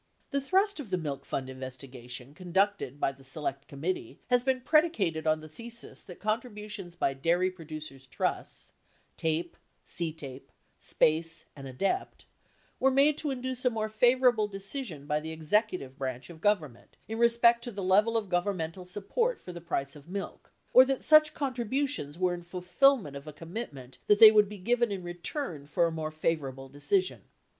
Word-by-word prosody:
The 280 -1 +1
thrust 385 +6 +2
of 265 -8 -7
the 185 - +1
Milk 145 -5 -4
Fund 130 -1 -3
investigation 130 -1 -8
conducted 185 -5 0
by 135 - +1
the 135 0 -18
Select 140 0 -3
Committee 140 -3 -4
has 245 0 +5
been 260 0 0
predicated 220 - +2
on 155 0 +2
the 155 - -10
thesis 235 +8 -10
that 180 - -11
contributions 210 -4 -4
by 140 -5 +1
dairy 170 +7 +1
producers' 155 -6 -9
trusts - - -3 0.4
(TAPE, 165 +2 -1 0.3
CTAPE, 155 -6 -5 0.3
SPACE, 165 +1 +1
and 135 -2 -8
ADEPT) 195 - -2 0.5
were 265 - +5
made 280 +3 +4
to 300 - -2
induce 255 -1 -3
a 250 - +4
more 220 -2 -2
favorable 240 0 +4
decision 195 - -6
by 150 +1 0
the 160 +1 -6
executive 160 - -1
branch 130 +3 -4
of 160 -1 -13
Government 160 - -1
in 225 +1 -4
respect 235 0 +5
to 240 - -4
the 200 -2 -5
level 210 +5 +4
of 215 -3 -2
governmental 180 -1 -2
support 465 - -1
for 180 - -9
the 170 - -8
price 140 -4 -3
of 145 +3 -14
milk, 195 +1 -6 0.2
or 255 - +10
that 270 0 -1
such 310 0 +6
contributions 255 - -1
were 180 0 +1
in 175 - -5
fulfillment 180 - +2
of 140 +2 -9
a 155 - -7
commitment 145 - -8
that 210 - +6
they 220 0 +11
would 210 -2 +5
be 210 - -7
given 235 +4 +1
in 190 -2 -4
return 175 - -5
for 170 +3 +2
a 165 - 0
more 160 -1 -3
favorable 150 -4 -2
decision. 370 - 0
180 Hz, 170 wpm, -29 LUFS, 150-235 Hz, 0.5 s, they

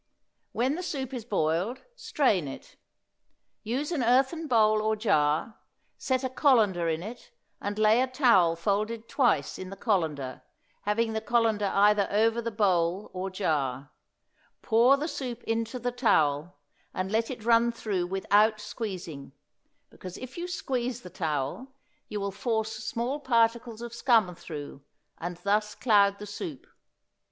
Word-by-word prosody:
When 255 +4 0
the 345 - -3
soup 270 -7 -4
is 240 -4 -5
boiled, 195 +4 -1
strain 285 - +1
it; 135 - -10 0.9
use 265 +8 -2
an 315 -6 0
earthen 265 +7 +2
bowl 215 -4 +4
or 220 0 +1
jar; 160 -1 +1 0.4
set 260 0 -1
a 260 - -1
colander 215 - +3
in 160 +1 -2
it, 235 +4 -9 0.3
and 205 +1 -3
lay 215 +2 +4
a 260 - +1
towel 235 - +4
folded 215 +6 -1
twice 245 -6 +1
in 185 - -6
the 195 - -7
colander, 160 - -1 0.4
having 220 +2 +1
the 220 - -2
colander 220 -2 +1
either 205 0 +4
over 225 +3 +2
the 230 - -2
bowl 190 -3 +1
or 185 +1 -3
jar; 145 -8 -2 0.7
pour 240 +4 +5
the 300 +3 -3
soup 245 -6 -5
into 230 +2 -2
the 245 0 -2
towel, 160 - +1 0.4
and 185 +1 -2
let 225 +1 +1
it 240 -5 -7
run 235 0 +4
through 200 -6 -2
without 205 +3 +2
squeezing, 185 - -6 0.6
because 185 -1 -9
if 255 0 -9
you 345 +1 -4
squeeze 250 -8 -3
the 180 - -11
towel 160 - -3 0.3
you 210 - -3
will 200 0 -2
force 220 +2 -1
small 235 +6 -3
particles 235 -3 +1
of 235 -1 -7
scum 230 -6 +3
through, 145 -4 -8 0.4
and 175 +1 -5
thus 210 +1 +1
cloud 200 -4 +3
the 210 - -8
soup. 170 -9 -7
215 Hz, 150 wpm, -28 LUFS, 185-240 Hz, 0.9 s, pour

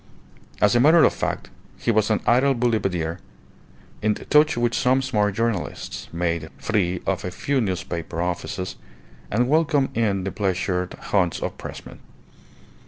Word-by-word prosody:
As 105 +2 +4
a - - +5
matter 155 +6 +6
of - - +5
fact, - - -3 0.3
he - - 0
was 110 -1 +2
an 110 - +1
idle 130 +3 +4
boulevardier, 95 -8 0 0.8
in 105 0 +2
touch 150 -2 +3
with 120 0 +1
some 130 +1 +3
smart 105 -6 0
journalists, 115 -5 -3
made 85 -2 -2
free 90 -6 -1
of 95 -3 -1
a 90 - -2
few 130 +9 -1
newspaper 85 -4 -3
offices, 90 +1 -3 0.5
and 120 +4 +1
welcomed 150 -2 +2
in 105 -4 +1
the 95 - -3
pleasure 90 -2 -1
haunts 90 -5 +1
of - - -4
pressmen. - - -9
105 Hz, 145 wpm, -23 LUFS, 90-125 Hz, 0.8 s, matter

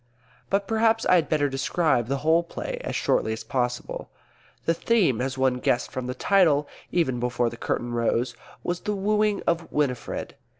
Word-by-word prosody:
But 195 0 +1
perhaps 225 0 +2
I - - +4
had 175 -3 +3
better 150 -2 +2
describe 135 -2 +1
the 140 +2 0
whole 165 +2 +5
play 170 - -6
as - - -3
shortly 110 - +1
as 110 0 -6
possible. 125 +1 -3 0.6
The 165 - +3
theme 170 - +2
as 130 +1 -2
one 130 -1 +2
guessed 120 0 0
from 130 -1 -4
the 125 - -3
title, 160 -8 +3 0.2
even 145 -8 +1
before 120 -1 0
the - - -7
curtain 120 +1 -2
rose 120 +1 0 0.3
was 175 0 -2
the 210 - -2
wooing 210 +1 +1
of 170 -1 0
Winifred. 140 -5 -2
145 Hz, 175 wpm, -25 LUFS, 125-180 Hz, 0.6 s, whole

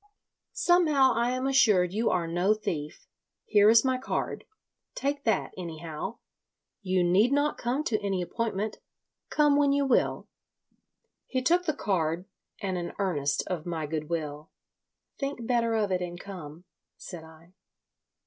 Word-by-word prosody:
"Somehow 310 -7 +4
I 235 +1 +1
am 255 +1 -1
assured 210 -10 +4
you 225 +3 +1
are 175 -2 +1
no 175 +5 +2
thief. 155 -8 -5 0.4
Here 210 -1 +5
is 230 +3 +6
my 260 -1 +1
card. - - -3 0.5
Take 280 +1 -2
that, 225 - 0
anyhow. 165 +2 -6 0.6
You 185 -2 +1
need 195 +8 +4
not 285 +1 +1
come 255 +5 -1
to 220 -7 0
any 195 -2 -1
appointment. 215 +1 -3 0.5
Come 295 -1 +3
when 285 -1 +4
you 280 0 +2
will." 265 - +1 1.0
He 255 -1 -2
took 350 +6 +3
the 310 -4 0
card, 175 - -1 0.3
and 190 -2 -2
an 175 - -5
earnest 145 -8 0
of 175 -3 -4
my 165 -3 -2
good 155 0 -4
will. 150 -2 -4 0.7
"Think 275 -4 -3
better 230 -1 +1
of 210 -3 0
it 180 -1 0
and 175 0 -5
come," 175 -5 -9 0.3
said 175 -4 -9
I. 160 +2 -17
200 Hz, 150 wpm, -28 LUFS, 170-255 Hz, 1.0 s, is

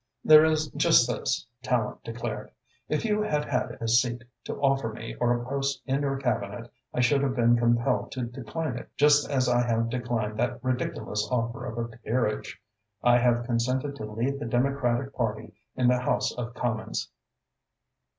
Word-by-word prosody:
"There 155 0 +9
is 155 -1 +2
just 150 -4 +4
this," 120 -3 -1 0.2
Tallente 125 -5 -1
declared. 115 -2 -5 0.4
"If 155 +8 0
you 210 -1 +1
had 150 -8 0
had 125 -3 -2
a 115 - -3
seat 120 +1 +2 0.2
to - - -4
offer 135 -4 +1
me 115 +1 -7
or 120 0 +2
a 120 - -7
post 140 +1 -1
in 135 +1 0
your 135 -1 0
Cabinet, 120 -3 -3 0.2
I 125 - 0
should 135 +3 +3
have 135 -2 0
been 120 -1 +4
compelled 120 0 +1
to 130 - -3
decline 125 +3 -4
it, - - -12
just 145 0 +5
as 130 -3 +1
I 120 0 +3
have 115 0 0
declined 115 -3 -2
that 120 0 -1
ridiculous 125 -4 -2
offer 115 -2 -2
of 120 -2 -6
a 115 -1 -4
peerage. 115 -2 -2 0.4
I 120 0 +5
have 120 -1 +2
consented 130 +4 -1
to 110 - -5
lead 120 +6 -2
the - - -4
Democratic 130 +1 0
Party 110 -2 -3 0.2
in 125 -1 +2
the 125 0 +4
House 125 - 0
of 120 0 -5
Commons." 110 - -3
120 Hz, 175 wpm, -27 LUFS, 115-135 Hz, 0.4 s, There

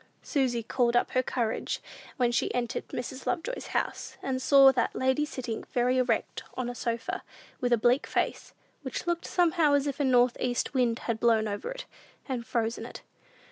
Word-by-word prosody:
Susy 250 -5 0
called 240 +1 +1
up 240 - +3
all - - -15
her 255 - +4
courage 235 -3 -2 0.4
when 245 -2 +2
she 240 - +1
entered 240 -2 -2
Mrs. 255 +2 -6
Lovejoy's 440 +9 -2
house, - - -3
and 260 -1 -1
saw 275 0 +7
that 250 -3 0
lady 260 +3 +2
sitting 250 -6 -5
very 250 +1 +2
erect 245 -3 0
on 245 -1 -2
a - - -7
sofa, 235 +10 -3 0.4
with 245 -3 0
a 240 - +5
bleak 245 +5 +2
face, - - -1 0.3
which 260 +2 -5
looked 345 -1 -1
somehow 330 -4 +3
as 285 0 +2
if 285 0 -3
a - - +2
north 250 -2 +4
east 245 +2 -1
wind 245 -3 +2
had 230 -2 -1
blown 225 -2 +3
over 205 - -4
it, - - -6 0.4
and 250 -4 -3
frozen 230 -1 -1
it. - - -9
250 Hz, 185 wpm, -28 LUFS, 235-275 Hz, 0.4 s, saw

